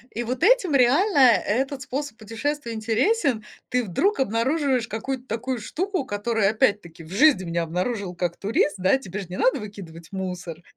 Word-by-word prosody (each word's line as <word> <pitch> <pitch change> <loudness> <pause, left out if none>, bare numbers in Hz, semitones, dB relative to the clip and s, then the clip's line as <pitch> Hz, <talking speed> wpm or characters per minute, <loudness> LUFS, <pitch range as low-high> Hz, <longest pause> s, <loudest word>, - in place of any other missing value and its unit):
И 240 - -2
вот 255 +6 -3
этим 400 -8 +4
реально 285 - +4
этот 260 +2 +3
способ 270 -2 -5
путешествия 230 +3 -4
интересен. 235 - +1 0.3
Ты 250 0 +1
вдруг 305 - 0
обнаруживаешь 260 +1 +1
какую-то 245 +4 -4
такую 245 +2 -3
штуку, 365 - -3
которую, 205 -2 0
опять-таки, 205 -8 0
в 160 - -14
жизни 260 -2 +4
б - - -6
не 170 - -3
обнаружил, 180 +3 -2
как 175 -1 -2
турист, 200 -1 +1
да? 190 +7 +3
Тебе 205 -6 -7
ж 185 -3 -8
не 185 - -6
надо 260 - +2
выкидывать 175 -6 -10
мусор. 180 -3 -5
230 Hz, 165 wpm, -24 LUFS, 195-270 Hz, 0.3 s, этим